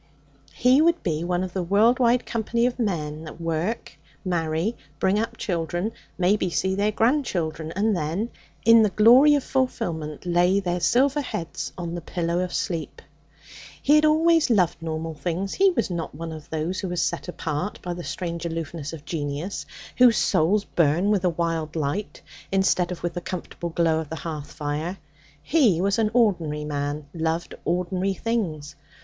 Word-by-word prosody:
He 255 +3 +5
would 335 +1 +3
be 160 -3 -1
one 175 +1 0
of 185 -1 -5
the 190 - -1
world 210 +8 +3
wide 245 0 +3
company 235 +1 0
of 250 0 -1
men 155 -8 -2
that 155 - -10
work, 165 +6 -3 0.3
marry, 170 +4 0 0.2
bring 195 +2 +2
up 225 - -3
children, 175 0 -2 0.3
maybe 185 +1 +2
see 190 +2 0
their 205 +2 +1
grandchildren, 195 - 0
and 210 +2 +2
then, 175 +8 -2 0.3
in 230 0 +8
the 215 - +4
glory 245 +9 +7
of 285 - 0
fulfilment, 165 - -2
lay 175 +2 +3
their 180 -2 -1
silver 270 - +3
heads 170 - -5
on 170 -2 -4
the 175 - -4
pillow 170 +1 -2
of 180 0 -2
sleep. 165 -3 -3 0.8
He 290 - +3
had 305 0 +6
always 320 +1 +4
loved 180 -7 +2
normal 160 0 -3
things. 175 +6 -3
He 390 0 +4
was 235 - -1
not 170 -4 -4
one 165 +1 -6
of 155 -2 -9
those 160 +4 -2
who 190 -3 -3
are - - -2
set 170 - -1
apart 165 +1 -3
by 175 - -3
the 175 0 -7
strange 170 -2 -4
aloofness 165 -2 -4
of 150 -2 -9
genius, 150 +4 -4 0.3
whose 245 -3 +7
souls 195 +3 +2
burn 170 +5 +2
with 200 -3 +1
a - - +4
wild 165 -2 -2
light, 160 +7 -3 0.3
instead 190 -2 +2
of 175 - -6
with 175 -1 -1
the 175 - -4
comfortable 175 -1 -5
glow 165 -1 +1
of 160 -2 -6
the 160 - -4
hearth 155 -2 -6
fire. 155 +5 -3 0.5
He 250 - +3
was 195 +3 +1
an 220 -1 +2
ordinary 170 -10 +2
man, 145 0 -3
loved 165 0 -2
ordinary 180 +3 0
things. 165 -11 -2
175 Hz, 175 wpm, -24 LUFS, 160-215 Hz, 0.8 s, in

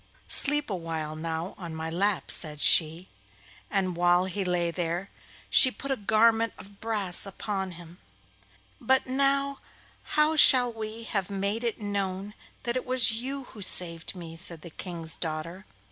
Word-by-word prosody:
'Sleep 295 +1 +4
a - - -1
while 160 -3 -5
now 160 +2 -5
on 170 -3 -7
my 160 0 -5
lap,' 190 +4 -1
said 150 -3 +3
she, 165 +4 +3 0.6
and 190 -3 -1
while 175 +1 +2
he 190 +1 -3
lay 175 -2 -1
there 175 +2 -4 0.4
she 260 - +7
put 275 +2 -7
a - - +1
garment 225 +1 +2
of 200 +1 -14
brass 210 -5 -1
upon 195 -1 -5
him. 175 0 -14 0.8
'But 265 0 +1
now, 275 +1 0 0.6
how 305 +1 +3
shall 250 -5 +6
we 220 +1 -7
have 200 -4 -2
it - - -7
made 210 +4 -2
known 200 -1 -4 0.3
that 240 0 -2
it 255 - -4
was 255 -2 +5
you 265 +5 -4
who 220 -4 -13
saved 170 -2 +4
me?' 165 -2 -9
said 165 -1 -4
the 170 - -10
King's 165 -2 -5
daughter. 165 +4 -5
195 Hz, 160 wpm, -26 LUFS, 170-230 Hz, 0.8 s, she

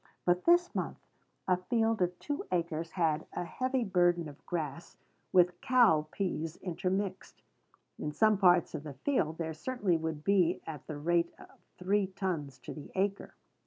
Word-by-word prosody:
But 180 0 +2
this 350 +1 +4
month - - -3 0.5
a 180 -1 +4
field 225 +3 0
of 180 0 +1
two 290 0 -3
acres 170 -2 -1
had 160 -4 0
a - - -2
heavy 255 +9 -1
burden 175 -4 +2
of 145 -1 -12
grass, 160 -2 -4 0.3
with 180 -1 +4
cow 220 -12 +4
pease 165 -4 -2
intermixed. 190 +2 -3 0.6
In 150 - -3
some 215 +6 +3
parts 180 -3 +4
of 155 - -4
the 145 -2 -8
field, 160 - 0
there 160 -1 -3
certainly 200 -1 0
would 160 -2 -4
be 190 -3 +3
at 155 -4 -8
the 150 - -5
rate 170 +3 +1
of - - -14 0.3
three 195 +2 +1
tons 175 -8 -3
to - - -7
the 150 - -9
acre. 195 +1 -1
175 Hz, 160 wpm, -31 LUFS, 160-195 Hz, 0.6 s, this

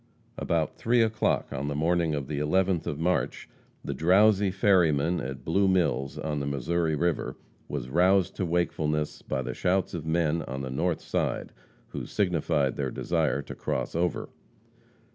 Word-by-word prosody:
About 80 -2 -1
three 120 0 +3
o'clock 110 -1 0
on 70 +2 -3
the 75 - -2
morning 80 +1 +1
of 70 -3 -4
the 75 -1 -3
11th 90 +3 +1
of 75 - -3
March, 90 0 -1 0.4
the 70 - -2
drowsy 95 +6 +4
ferryman 90 -4 +3
at 65 +1 -6
Blue 95 +4 +2
Mills, 85 -8 +1
on 75 -2 -2
the 70 - -3
Missouri 80 +4 0
river, 85 +2 -1 0.3
was 70 -4 -4
roused 90 +6 +3
to - - -1
wakefulness 75 -3 -1
by 65 -1 -3
the - - -4
shouts 95 +1 0
of 85 -4 -4
men 80 0 +1
on 65 -2 -5
the 65 - -4
north 80 +5 -1
side, - - -2 0.4
who - - -6
signified 80 -8 0
their - - -1
desire 80 -4 0
to - - -8
cross - - -3
over. 85 +1 -1
80 Hz, 160 wpm, -27 LUFS, 70-90 Hz, 0.4 s, drowsy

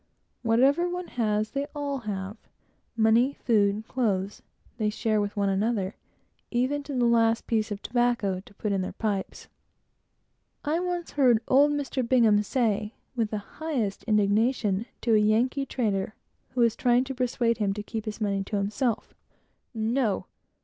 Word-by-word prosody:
Whatever 270 +9 +3
one 360 0 -5
has, 215 -2 0
they 280 +1 -2
all 285 -2 -2
have. 200 -3 -4 0.6
Money, 230 +5 +4
food, 210 -1 +1
clothes, 200 -6 -1 0.4
they 215 -1 +1
share 215 0 0
with 205 0 -4
one 200 -1 +2
another; 195 0 0 0.6
even 260 +4 0
to 280 -1 -6
the 245 -1 +2
last 230 -1 +3
piece 220 -1 0
of 205 0 -5
tobacco 240 -6 +1
to 195 - -16
put 210 - -2
in 195 -1 +1
their 185 - -4
pipes. 205 -4 -3 1.2
I 310 +3 +1
once 355 -1 -3
heard 250 -6 +4
old 285 +3 +5
Mr. 280 -2 -2
Bingham 230 -4 +4
say, 215 -2 -1 0.2
with 225 -3 0
the 215 - -2 0.2
highest 260 -11 -2
indignation, 215 0 +2
to 230 - +2
a 215 - +6
Yankee 240 +6 +2
trader 210 -5 -1 0.4
who 250 - +2
was 230 -1 +3
trying 245 +1 +3
to 265 +1 -5
persuade 240 -2 0
him 205 -2 +1
to 210 - -4
keep 220 0 -5
his 215 0 -5
money 200 -2 0
to 210 - -4
himself 210 +4 -1 0.6
"No! 225 -1 0
225 Hz, 155 wpm, -27 LUFS, 210-255 Hz, 1.2 s, a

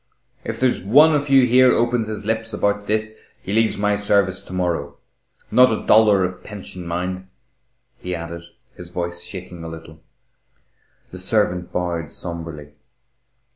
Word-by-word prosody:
"If - - -5
there's 130 -1 +1
one 145 - +5
of 145 -1 -1
you 135 -2 +6
here 125 +1 +5
opens 120 -1 +1
his 105 -1 -6
lips 110 0 -2
about 105 0 -1
this, 110 0 -1 0.3
he 100 - -6
leaves 110 -1 +2
my 105 0 +1
service 100 -2 +1
to - - -12
morrow. 90 -2 -2 0.5
Not 125 0 +6
a 110 - -3
dollar 105 -3 +5
of 90 0 -4
pension, 95 -4 -9
mind," 90 +2 -3 0.7
he 90 0 -4
added, 85 0 -7 0.3
his 90 -1 -11
voice 85 0 -4
shaking 90 -3 -9
a - - -6
little. 80 -1 -10 1.1
The 95 - -9
servant 90 -2 0
bowed 85 -3 -3
sombrely. 80 -4 -7
95 Hz, 150 wpm, -21 LUFS, 85-110 Hz, 1.1 s, you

